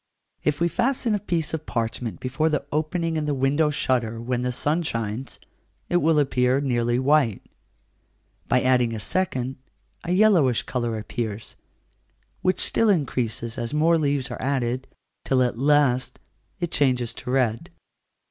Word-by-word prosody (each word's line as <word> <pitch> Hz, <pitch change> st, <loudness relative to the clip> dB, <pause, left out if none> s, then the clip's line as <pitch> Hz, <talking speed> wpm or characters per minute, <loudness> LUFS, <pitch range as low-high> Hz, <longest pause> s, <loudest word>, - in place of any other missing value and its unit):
If 150 Hz, -1 st, 0 dB
we 170 Hz, -, +3 dB
fasten 240 Hz, +3 st, 0 dB
a 205 Hz, -, +1 dB
piece 170 Hz, -6 st, -2 dB
of 155 Hz, -1 st, -4 dB
parchment 115 Hz, -1 st, -3 dB
before 135 Hz, +5 st, 0 dB
the 150 Hz, -2 st, -1 dB
opening 160 Hz, +2 st, -1 dB
in 155 Hz, -, -1 dB
the 145 Hz, -1 st, 0 dB
window 140 Hz, +4 st, +2 dB
shutter 120 Hz, -5 st, -1 dB
when 120 Hz, +1 st, -2 dB
the 125 Hz, 0 st, -1 dB
sun 150 Hz, +7 st, 0 dB
shines, 115 Hz, -3 st, -4 dB, 0.5 s
it 175 Hz, -, +3 dB
will 160 Hz, -2 st, +3 dB
appear 130 Hz, -2 st, +2 dB
nearly 120 Hz, -3 st, +1 dB
white; 130 Hz, -5 st, +2 dB, 1.0 s
by 125 Hz, -, +2 dB
adding 125 Hz, -3 st, +2 dB
a -, -, -4 dB
second, 130 Hz, -, -2 dB, 0.5 s
a 170 Hz, -, -3 dB
yellowish 180 Hz, -, +4 dB
colour 120 Hz, -3 st, -2 dB
appears, 110 Hz, 0 st, -5 dB, 0.9 s
which 185 Hz, 0 st, +1 dB
still 225 Hz, -, +2 dB
increases 120 Hz, -, -1 dB
as 120 Hz, +4 st, -3 dB
more 165 Hz, +2 st, +4 dB
leaves 140 Hz, -3 st, 0 dB
are -, -, -6 dB
added, 130 Hz, -1 st, -1 dB, 0.4 s
till 130 Hz, -1 st, +2 dB
at 120 Hz, -2 st, -2 dB
last 140 Hz, -3 st, +2 dB, 0.4 s
it 175 Hz, -2 st, -2 dB
changes 125 Hz, -4 st, +1 dB
to 125 Hz, -, -8 dB
red. 125 Hz, -4 st, 0 dB
135 Hz, 150 wpm, -24 LUFS, 120-155 Hz, 1.0 s, yellowish